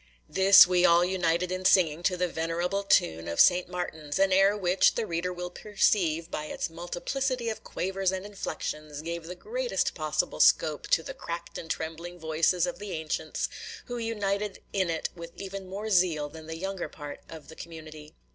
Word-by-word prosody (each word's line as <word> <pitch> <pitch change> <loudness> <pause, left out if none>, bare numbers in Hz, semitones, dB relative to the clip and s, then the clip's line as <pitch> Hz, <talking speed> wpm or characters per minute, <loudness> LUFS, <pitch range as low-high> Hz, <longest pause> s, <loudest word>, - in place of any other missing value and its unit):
This 195 +1 +8
we 180 -1 +2
all 170 0 +6
united 180 -1 0
in 185 0 -3
singing 170 -4 +4
to 180 - -4
the 180 0 +1
venerable 170 +4 -1
tune 80 - +2
of 85 0 -4
St. 180 0 +5
Martin's, 160 -4 -4
an 195 0 +3
air 195 +2 +4
which, 185 -1 +3
the 230 - -1
reader 170 0 -2
will 180 0 -5
perceive, 175 -5 +1
by 150 - -3
its 155 - -4
multiplicity 235 +9 -2
of 220 - -5
quavers 190 0 -1
and 190 +1 -4
inflections 155 -7 -5
gave 170 0 -5
the 180 - -6
greatest - - -2
possible - - -2
scope - - +4
to - - +3
the - - -6
cracked 170 - -6
and 165 - -9
trembling 165 +2 -5
voices 160 +2 +1
of 175 0 -5
the 205 -2 -6
ancients, 160 -1 -2 0.4
who 245 -1 -5
united 210 -3 -2
in 190 -3 +1
it 160 -1 -1
with 170 -1 -10
even 195 -1 -7
more 205 +3 -5
zeal 170 -6 +2
than 160 +1 -11
the 160 0 -5
younger 190 +1 -4
part 145 -2 -8
of 160 -2 -10
the 160 - -12
community. 155 -2 -10
175 Hz, 185 wpm, -28 LUFS, 165-195 Hz, 0.4 s, This